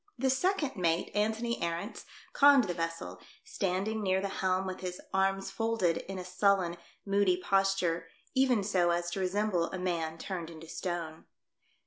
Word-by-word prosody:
The 265 +1 +2
second 305 0 +1
mate, 170 -2 +1
Antony 220 +3 0
Arents, 170 +6 -3 0.3
conned 280 -2 +7
the 180 -5 -2
vessel, 165 - -4 0.2
standing 195 +3 -1
near 190 -2 +2
the 200 +1 -2
helm 185 0 +1
with 185 0 -4
his 180 -1 -5
arms 195 0 +1
folded 225 -7 +1
in 195 0 -6
a 180 - -5
sullen, 185 -1 +2 0.3
moody 200 -2 +3
posture, 185 -3 +1 0.3
even 260 -5 +3
so 185 -3 +2
as 175 0 0
to 195 - -3
resemble 190 -1 +1
a 190 - -5
man 170 -3 -2
turned 170 -1 -5
into 165 -1 -11
stone. 165 -2 -4
185 Hz, 155 wpm, -31 LUFS, 175-205 Hz, 0.3 s, conned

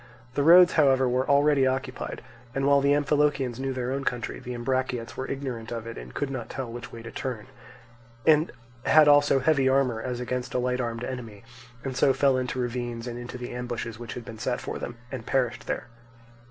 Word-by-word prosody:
The 140 - 0
roads, 175 +4 +8
however, 135 -4 +4
were 125 +2 0
already 140 -1 +4
occupied, 130 -1 -3 0.3
and 135 0 0
while 140 0 +5
the 140 +1 +3
Amphilochians 145 -4 +1
knew 135 0 -2
their 125 -1 -2
own 135 +1 -2
country, 120 -3 -3
the 125 0 -6
Ambraciots 125 -1 -2
were 130 - -4
ignorant 130 -4 -4
of 115 -2 -4
it 115 - -6
and - - -9
could 140 -1 -2
not 125 -4 -5
tell 130 -3 -5
which 120 0 -8
way 115 - -9
to 115 - -8
turn, 120 -6 -4 0.8
and 155 +1 +4 0.3
had 155 -1 +6
also 145 -1 +6
heavy 135 0 +3
armour 130 -4 +2
as 125 0 -3
against 125 +1 -3
a - - +3
light 125 0 0
armed 115 0 -3
enemy, 115 -6 -6 0.4
and 135 -1 -4
so 135 +1 +4
fell 135 0 +3
into 130 0 -2
ravines 120 -1 -3
and 120 -1 -5
into 120 +1 -7
the 125 0 -6
ambushes 120 -2 -5
which 120 -2 -7
had 120 - -7
been 110 -1 -9
set 125 +2 -1
for - - -5
them, 120 - -6
and 125 -4 -6
perished 125 -2 0
there. - - -2
130 Hz, 205 wpm, -27 LUFS, 120-135 Hz, 0.8 s, roads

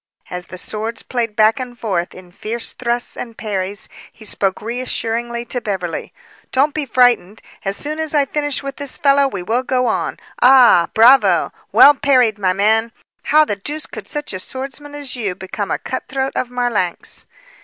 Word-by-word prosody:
As 180 0 -4
the 185 - -9
swords 220 +5 -4
played 230 -4 -2
back 215 +2 +4
and 250 -1 -6
forth 185 -7 -2
in 180 -1 -13
fierce 225 +5 -5
thrusts 240 0 -2
and 230 -2 -7
parries, 200 -2 -3 0.2
he 220 - -14
spoke 195 -2 +1
assuringly 235 0 -3
to 245 0 -3
Beverly: 185 -6 -4 0.4
"Don't 280 +3 +2
be 300 -3 -3
frightened! 235 -5 +3 0.2
As 195 0 -1
soon 305 +2 -4
as 315 -1 -2
I 285 -1 +4
finish 290 0 -1
with 275 0 -6
this 285 -2 -4
fellow, 280 -1 +4
we 195 -9 -5
will 230 +7 0
go 255 -1 0
on! 225 - -1 0.2
Ah! 250 -9 +7
Bravo! 225 -6 +5 0.2
Well 270 +7 +8
parried, 255 -6 +2
my 185 -2 +2
man! 220 +4 +2 0.3
How 310 +1 +5
the 205 - -1
deuce 295 +10 -4
could - - -9
such 295 -6 -5
a 185 - -4
swordsman 275 +7 -7
as 285 -3 -4
you 205 -7 -2
become 195 +2 -5
a - - 0
cutthroat 265 +1 -3
of 250 - -1
Marlanx?" 245 -8 -2
235 Hz, 175 wpm, -18 LUFS, 205-270 Hz, 0.4 s, Well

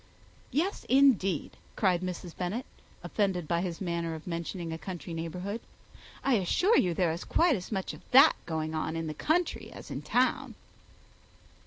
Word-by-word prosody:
"Yes, 355 +8 -1
indeed," 245 - +4 0.2
cried 185 -4 +2
Mrs. 180 -2 -5
Bennet, 190 +8 -3 0.4
offended 190 -6 0
by 170 +1 +1
his 175 -3 -3
manner 170 -3 -2
of 160 - -10
mentioning 170 0 -4
a - - -4
country 175 -2 -6
neighbourhood. 180 +7 -4 0.6
"I 270 -4 +4
assure 360 - +3
you 175 -3 +3
there 175 -2 +2
is 165 +2 -4
quite 335 -4 +3
as 180 0 -6
much 190 -3 -2
of - - -11
that 265 +2 +8
going 160 -1 -2
on 160 +1 -2
in 165 0 -2
the 155 - -3
country 325 - 0
as - - -10
in - - -4
town." - - +1
180 Hz, 165 wpm, -30 LUFS, 165-215 Hz, 0.6 s, that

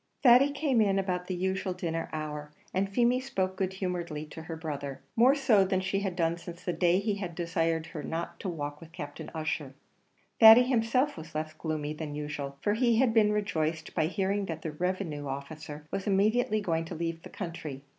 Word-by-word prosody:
Thady 255 +2 +7
came 280 -5 +2
in 195 -2 +3
about 180 -2 -1
the 185 - -2
usual 190 +1 -1
dinner 165 -2 -3
hour, 150 -1 -5 0.2
and 195 +1 +1
Feemy 240 +4 +3
spoke 190 -8 -2
good 190 0 -1
humouredly 175 -5 -3
to 160 - -7
her 160 0 -6
brother 145 -4 -5 0.2
more 250 +4 +6
so 250 -8 +4
than 190 0 +1
she 190 +1 -1
had 195 -3 -2
done 170 -1 +1
since 175 0 -9
the 180 - -1
day 175 0 +3
he 200 +1 0
had 180 -4 -5
desired 165 -1 0
her 160 -2 -7
not 170 +2 -4
to 195 - -3
walk 145 -3 -5
with 165 0 -12
Captain 145 -4 -7
Ussher. 155 -3 -3 0.6
Thady 225 +2 +10
himself 255 +2 +1
was 155 -1 -10
less 155 0 -3
gloomy 155 -2 -3
than 150 -1 -5
usual, 145 -2 -5
for 205 - +2
he 235 0 +3
had 245 -2 +3
been 215 -2 +5
rejoiced 160 -6 -1
by 155 - +1
hearing 195 +2 -1
that 160 -1 -5
the 160 - -3
revenue 165 -3 -2
officer 150 +2 -6
was 195 - -3
immediately 215 +2 +2
going 165 -4 0
to - - -6
leave 165 0 -3
the - - -11
country. 160 -7 -6
175 Hz, 200 wpm, -29 LUFS, 155-200 Hz, 0.6 s, Thady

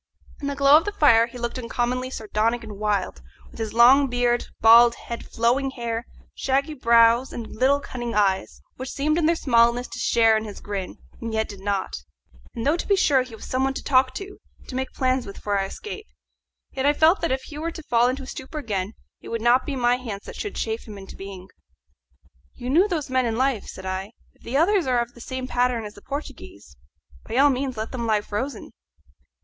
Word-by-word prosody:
In 285 - -3
the 280 - -2
glow 280 +1 +7
of 325 - 0
the 410 - -1
fire 235 - +5
he 245 - -11
looked 240 +1 -4
uncommonly 250 +1 -2
sardonic 225 0 -1
and 210 -2 -9
wild, 205 - -1 0.3
with - - -14
his 220 -2 -3
long 255 +4 +6
beard, 245 -1 0
bald 235 +1 +7
head, 235 - -7
flowing 245 +4 0
hair, 235 -2 -4 0.3
shaggy 275 +3 0
brows, 235 -1 +4
and 235 - -6
little 270 +4 +3
cunning 240 -4 -5
eyes, 195 -2 0
which 260 0 -6
seemed 305 +4 0
in 315 - +2
their 335 - +3
smallness 235 -3 +3
to - - -7
share 225 -1 +4
in 220 - 0
his 205 -2 -8
grin, 195 -3 -5 0.2
and 230 -1 -4
yet 220 0 0
did 200 -2 -10
not; 195 -1 -2 0.6
and 230 - -4
though 300 +4 +3
to - - -5
be 400 - +4
sure 285 -8 +3
he 255 -3 -8
was 220 - -11
some 255 +1 -1
one 270 0 0
to - - -5
talk 255 -1 +3
to 395 0 -7 0.2
and - - -21
to - - -7
make 265 +1 -3
plans 255 -2 0
with 200 - -9
for 205 -1 -2
our 195 - 0
escape, 425 - -8 0.6
yet 270 +1 -1
I 290 - +5
felt 320 +5 +4
that 335 - 0
if 260 0 -1
he 300 -1 -9
were 330 +2 -2
to 325 -1 -9
fall 240 -3 +3
into 265 +2 -2
a - - -8
stupor 265 +3 -8
again 205 -7 -3 0.3
it - - -10
would 230 - -2
not 245 +2 +4
be 285 - -2
my 245 -1 +2
hands 220 -6 -7
that - - -9
should 415 - -5
chafe 225 0 -3
him 210 -2 -9
into 195 -1 -11
being. 190 -1 -9 1.1
"You 245 +1 -5
knew 355 +8 +5
those 315 -8 -3
men 255 -1 +2
in 225 - -1
life," 260 -4 0
said 190 - -9
I. 190 +3 -4 0.2
"If - - -32
the 255 +4 -2
others 360 +1 +3
are 250 -1 +2
of 235 0 -3
the 240 - -14
same 260 +1 -5
pattern 245 -3 0
as 210 - -8
the 205 - -15
Portuguese, 285 +6 -8 0.5
by 225 - -4
all 285 +1 +6
means 260 -1 -3
let 220 +1 -4
them 235 -3 -3
lie 215 -2 +2
frozen." 245 +7 -5
245 Hz, 225 wpm, -24 LUFS, 225-275 Hz, 1.1 s, glow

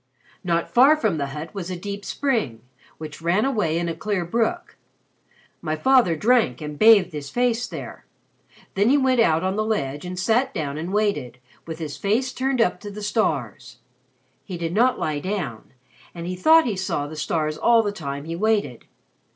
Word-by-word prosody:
Not 170 -2 0
far 275 +6 +5
from 210 - 0
the 140 - -1
hut 150 +6 -7
was 190 -3 -5
a 185 - -3
deep 200 +3 -6
spring, 220 - -1 0.4
which 155 0 -9
ran 175 +7 +1
away 210 -12 0
in 170 0 -1
a 165 - -2
clear 190 +1 -2
brook. 235 - -1 0.9
My 155 - -2
father 245 -2 +3
drank 220 - +2
and 150 -1 -7
bathed 215 -6 +6
his 145 -2 -6
face 245 - 0
there. - - -9 0.7
Then 200 +4 +2
he 285 - +5
went 260 -2 +2
out 165 -6 +3
on 190 +2 -1
the 215 - +1
ledge, 145 -10 -2
and 180 0 -6
sat 225 +8 +1
down 145 -1 -3
and 170 +4 -5
waited, 200 - -1 0.3
with 160 -1 -5
his 155 -3 -6
face 240 +6 0
turned 260 -1 0
up 180 -4 +1
to 205 - -8
the 205 +1 -8
stars. 150 - -2 0.7
He 185 - -6
did 165 0 -3
not 245 +5 +3
lie 150 -2 -2
down, 155 - -4 0.4
and 170 -1 -6
he 180 +1 -3
thought 320 - +5
he 225 -5 -1
saw 185 -6 -2
the 155 +2 -8
stars 155 0 -1
all 230 +7 +4
the 205 - -1
time 140 -6 -6
he 165 +1 -4
waited. 205 - 0
185 Hz, 190 wpm, -23 LUFS, 155-225 Hz, 0.9 s, bathed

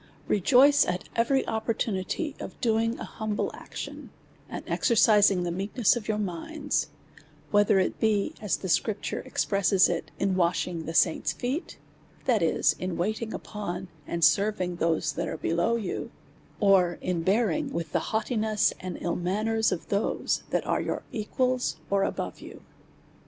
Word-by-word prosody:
Rejoice 265 +8 +5
at 180 0 -2
every 265 +4 +2
opportunity 220 - -2
of - - -8
doing 230 0 +1
an - - -6
humble 215 -2 -3
action, - - -8 0.4
and - - -6
exercising 210 -5 +4
the 175 - -2
meekness 200 +6 +1
of 230 -3 -5
your 215 -1 0
minds; 215 - -2 0.6
whether 205 -1 +4
it 190 - 0
be, 210 -2 +1
as 210 -3 0
the 190 - -6
Scripture 205 +3 0
expresses 195 -1 +2
it, 170 -1 -3
in 195 -1 0
wash 175 -1 +2
ing 170 -3 -5
the 165 - -5
saints' 165 - +3
feet, 265 +8 -4 0.5
that 235 -6 +3
is, 155 -2 +2
in 185 -2 -3
waiting 215 +5 -2
upon, 185 -3 -5 0.2
and 170 -1 -2
serv 200 +7 +3
ing 180 -1 -2
those 165 -1 0
that 170 0 -3
are 160 - -4
below 170 +9 +1
you; 220 -5 -3 0.5
or 190 -4 +4
in 180 -2 -1
bearing 235 - +1
with 165 - -4
the - - 0
haughtiness 220 -1 +1
and 180 -2 -5
ill 170 - -1
manners 215 +5 0
of 185 - -4
those 200 +1 0
that - - 0
are - - 0
your - - -3
equals, 250 +3 -1
or 200 -1 +3
above - - -3
you. - - -11
205 Hz, 155 wpm, -27 LUFS, 180-225 Hz, 0.6 s, Rejoice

